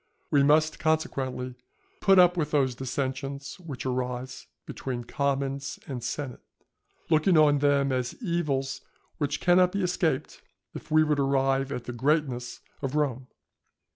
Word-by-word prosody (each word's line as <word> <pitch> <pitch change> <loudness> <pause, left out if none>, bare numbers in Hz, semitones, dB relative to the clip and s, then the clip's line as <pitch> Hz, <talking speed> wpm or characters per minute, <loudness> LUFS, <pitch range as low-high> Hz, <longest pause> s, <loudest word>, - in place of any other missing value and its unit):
We 145 - +5
must, 155 +2 +3
consequently, 135 -6 -1 0.5
put 195 -1 +5
up 180 -1 +6
with 155 -4 -1
those 135 -4 +2
dissensions 135 +3 -4
which 150 -8 -7
arise 125 0 -3 0.2
between 125 -2 -5
commons 140 +1 -2
and 125 -4 -6
senate, 125 +1 -4 0.7
looking 160 +3 +4
on 145 -2 +5
them 140 -1 +2
as 125 -1 -2
evils 155 - -1 0.4
which 145 -1 -1
cannot 180 0 +4
be 200 -1 -1
escaped 175 -6 -1 0.3
if - - -9
we 155 0 +5
would 150 -2 +1
arrive 135 0 +1
at 125 - -4
the 120 - -6
greatness 130 -2 -1 0.2
of 135 0 -3
Rome. 135 -4 -1
140 Hz, 140 wpm, -27 LUFS, 130-155 Hz, 0.7 s, up